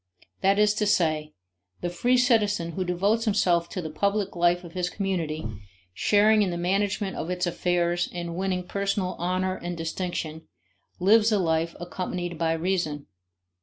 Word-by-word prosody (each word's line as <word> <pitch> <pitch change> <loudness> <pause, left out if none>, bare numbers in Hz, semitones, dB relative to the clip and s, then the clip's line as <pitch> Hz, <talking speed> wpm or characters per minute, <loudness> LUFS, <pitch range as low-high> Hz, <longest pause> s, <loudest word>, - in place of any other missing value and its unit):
That 195 +1 +3
is 210 0 +4
to 210 - +2
say, 155 -5 +1 0.5
the 175 - -2
free 245 +8 +2
citizen 210 -8 +2
who 185 +3 -2
devotes 200 +6 +1
himself 180 -5 +2
to 185 - -4
the 160 - -5
public 200 +3 0
life 175 +1 +2
of 170 - -10
his 180 -1 -1
community, 175 -6 -2 0.5
sharing 210 - +4
in 200 - +2
the 175 - -3
management 195 +2 0
of 165 - -4
its 180 0 -1
affairs 175 0 0
and 170 -1 -5
winning 185 -1 -2
personal 195 -2 -1
honor 185 +2 -1
and 175 0 -5
distinction, 165 -1 -4 0.5
lives 215 +4 +5
a 210 - +3
life 165 -2 0
accompanied 175 -1 -4
by 165 -1 +2
reason. 165 -4 -1
180 Hz, 160 wpm, -26 LUFS, 170-200 Hz, 0.5 s, lives